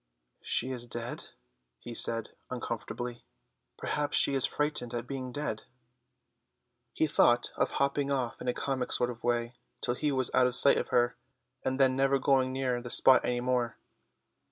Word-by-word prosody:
"She 130 - 0
is 120 -2 -5
dead," 120 0 -6 0.5
he 120 - -10
said 115 -1 0 0.2
uncomfortably. 120 0 -6 0.5
"Perhaps 145 -1 -1
she 140 - +7
is 135 -2 +3
frightened 150 -5 -2
at 120 - -4
being 130 -2 -6
dead." 145 -6 -5 1.3
He - - 0
thought 120 -5 +2
of - - 0
hopping 140 0 0
off 130 -4 -3
in - - -7
a 125 - +1
comic 130 -2 -3
sort 125 0 +1
of 120 - -13
way 120 0 -1 0.3
till 120 - -1
he 150 +4 -2
was 130 -2 +3
out 125 - +4
of 125 - -2
sight 140 +2 +8
of - - -4
her, 120 0 +1 0.5
and 130 +1 -2
then 130 -1 +3
never 135 +1 +2
going 130 -1 +1
near 130 -2 -2
the 120 - -8
spot 130 +2 +5
any 120 0 -2
more. 125 -2 -1
125 Hz, 170 wpm, -29 LUFS, 120-135 Hz, 1.3 s, sight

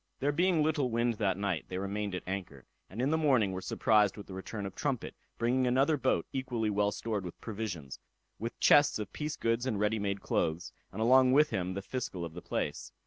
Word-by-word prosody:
There 140 +2 +1
being 170 +1 +2
little 150 -4 +1
wind 115 -1 0
that 95 -4 +1
night, 100 -5 -1
they 90 - -4
remained 100 0 -3
at 90 - -5
anchor, 90 -9 -5 0.2
and 100 - -9
in 130 +4 +1
the 160 - +2
morning 130 -10 +3
were 95 0 -4
surprised 105 +1 +2
with 105 - -8
the 95 - -10
return 100 +2 -5
of 95 - -5
Trumpet, 135 -5 -2 0.2
bringing 125 +2 +2
another 135 +5 +3
boat 115 - +1
equally 120 -5 -1
well 105 0 +2
stored 105 -1 -3
with 90 - -8
provisions, 100 - -5 0.4
with 115 +3 -5
chests 145 0 +5
of 105 -3 -6
piece 150 0 -3
goods 115 +2 0
and 110 -6 -1
ready 105 +1 +1
made 100 -1 -1
clothes, 80 -1 -1 0.2
and 110 +3 -2
along 130 +2 +6
with 150 +2 +5
him 95 0 -2
the 100 - -4
fiscal 95 -6 -4
of 80 - -8
the 90 - -8
place. - - -3
110 Hz, 215 wpm, -31 LUFS, 95-130 Hz, 0.4 s, along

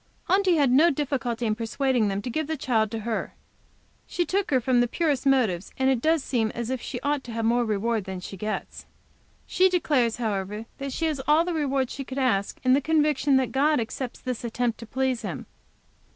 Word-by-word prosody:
Aunty 380 -2 +3
had 285 -5 +3
no 305 +7 +6
difficulty 250 -6 -1
persuading 235 +1 0
them 200 0 -2
to 250 - -4
give 310 +3 -2
the 315 0 -2
child 225 -5 +1
to 225 0 -4
her. 225 0 -3 0.7
She 350 - -1
took 390 +2 -1
from 250 -1 +3
the 245 - +2
purest 285 -1 0
motives, 220 -10 +2
and 265 0 +3
it 250 -3 0
does 320 0 +2
seem 225 -4 0
as 235 +1 -3
if 260 -2 -2
she 245 - -5
ought 285 -1 0
to 240 - -7
have 225 0 -2
more 240 +2 +3
reward 220 -1 -1
than 190 -1 -5
she 180 - -8
gets. 210 +3 -5 0.6
She 375 +1 +3
declares, 285 -10 +1
however, 210 -2 -3
that 275 0 -4
she 325 - -2
has 305 -4 -1
all 310 +3 +4
the 355 - -2
reward 275 -4 0
she 275 - -5
could 265 0 -8
ask 230 -7 0
in 255 0 +4
the 280 - +4
conviction 300 -2 +2
that 260 -1 0
God 295 +2 +2
accepts 240 +2 -4
this 250 -2 -4
attempt 235 0 -1
to 230 - -9
please 260 -1 -1
Him. - - -5
255 Hz, 210 wpm, -26 LUFS, 230-290 Hz, 0.7 s, no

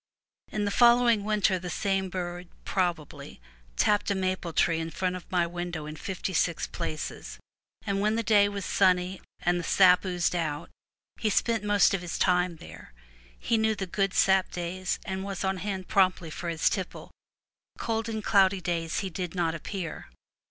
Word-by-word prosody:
In 210 -1 -1
the 205 - -1
following 235 -2 +5
winter 205 -3 +1
the 180 0 -6
same 195 +1 -1
bird 175 -1 -5 0.2
(probably) 175 - -3 0.4
tapped 205 - +2
a 200 - +1
maple 185 -2 -2
tree 165 0 +2
in 165 0 -3
front 185 +2 -2
of 180 - -9
my 175 -2 +2
window 175 -2 -5
in 155 0 -7
fifty 190 +1 -4
six 170 0 +1
places; 155 - -5 0.5
and 200 -1 -1
when 215 +1 +2
the 230 - 0
day 205 -1 +4
was 200 -1 -5
sunny, 185 -1 +2 0.2
and 175 0 +1
the - - -4
sap 180 +1 +5
oozed 180 -2 0
out, 160 -2 -3 0.5
he 220 - +1
spent 225 +1 +1
most 205 -2 +4
of 195 - -1
his 175 -1 -4
time 180 -1 +2
there. 80 - -13 0.4
He 225 - 0
knew 220 0 +2
the 195 - -3
good 195 +1 -1
sap 190 -1 +4
days, 180 +1 -3
and 190 0 -3
was 195 0 -4
on 190 0 0
hand 190 0 -4
promptly 185 -4 +2
for 170 +2 -5
his 165 -1 0
tipple; 190 -3 -3 0.7
cold 225 0 -2
and 220 -1 -4
cloudy 195 -3 +4
days 170 -2 -2
he 190 -2 -4
did 180 +1 -5
not 170 -2 0
appear. 170 +1 -6
185 Hz, 180 wpm, -28 LUFS, 175-200 Hz, 0.7 s, following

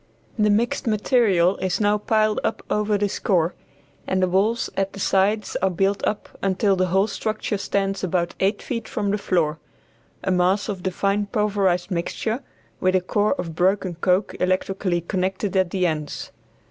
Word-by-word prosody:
The 210 0 +4
mixed 230 +4 +1
material 210 -5 +3
is 185 -1 -1
now 210 0 +2
piled 215 0 +2
up - - -2
over 210 0 +1
this 200 -1 -1
core, 175 -4 +1 0.5
and 190 - +1
the - - +3
walls 205 +6 +1
at 195 0 -1
the 195 - -8
sides 200 +3 +1
are 190 - +3
built 195 +3 0
up 210 - -4
until 195 +1 +2
the 185 0 +1
whole 190 +3 +3
structure 215 -1 -3
stands 195 0 -1
about 175 -1 0
eight 195 +3 +1
feet 230 -3 -4
from 205 -2 -1
the 205 - 0
floor 165 -5 0 0.6
a 190 - 0
mass 185 +3 +2
of 195 -3 -3
the 185 - -1
fine 200 +2 0
pulverized 200 -4 0
mixture, 220 +7 -2 0.4
with 185 0 +2
a 185 - +3
core 205 +3 +1
of 170 -2 -5
broken 185 +2 +1
coke 180 +3 +1
electrically 185 -1 0
connected 190 +3 -2
at 190 -2 +3
the 185 0 0
ends. 155 -3 -3
195 Hz, 170 wpm, -23 LUFS, 180-210 Hz, 0.6 s, The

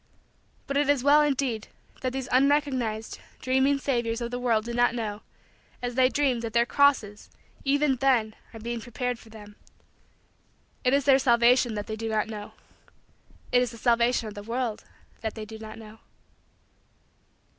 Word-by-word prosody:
But 275 - -2
it 290 0 +2
is 285 -3 +2
well, 290 +2 +6
indeed, 270 -6 0 0.3
that 255 - -1
these 265 0 -4
unrecognized, 260 -5 +1 0.2
dreaming, 265 +2 +2
saviors 235 -4 -1
of 235 0 -4
the 245 - -3
world 230 -3 +1
do 235 - -5
not 240 0 +2
know, 215 -3 -4 0.6
as 245 0 -4
they 255 +1 +4
dream, 270 -4 +1
that 230 -1 -5
their 235 0 +4
crosses, 245 -7 +2 0.3
even 280 -1 +2
then, 240 -5 +2 0.2
are 225 - -10
being 235 +1 -4
prepared 245 +1 -3
for 225 - -16
them. 210 -1 -13 1.3
It 255 +1 +3
is 280 - 0
their 270 -1 +6
salvation 240 -1 +4
that 205 0 -4
they 220 - -5
do 225 +1 -4
not 215 -1 0
know. 210 -2 -8 1.0
It 245 - +4
is 250 - 0
the 230 - -11
salvation 235 0 +2
of 210 - -7
the 205 - -8
world 230 +1 -3 0.3
that 220 -1 -4
they 220 -1 -6
do 220 +1 -10
not 220 0 -9
know. 220 0 -12
240 Hz, 170 wpm, -26 LUFS, 220-265 Hz, 1.3 s, well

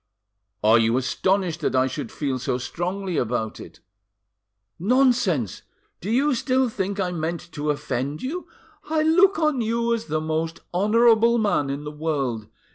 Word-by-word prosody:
"Are 110 +2 +6
you 115 +2 +2
astonished 170 +6 0
that 140 - 0
I 130 0 +4
should 140 +2 -5
feel 135 -3 -2
so 125 0 -1
strongly 180 +7 -3
about 110 -2 -2
it?" - - -12 1.0
"Nonsense! 225 - +2 0.4
Do 195 - -6
you 270 +6 +2
still 255 +1 +1
think 200 -1 -3
I 185 -2 0
meant 170 +1 -4
to 150 -1 -3
offend 140 0 -2
you? 330 +8 -4 0.4
I 310 -1 +2
look 365 +5 +4
on 305 -5 +1
you 230 +1 0
as 230 -1 -2
the 155 0 -1
most 160 +1 -2
honourable 230 +4 +4
man 205 -10 +1
in 140 +2 -4
the 150 - -6
world. 140 -8 -2
175 Hz, 155 wpm, -24 LUFS, 145-235 Hz, 1.0 s, Are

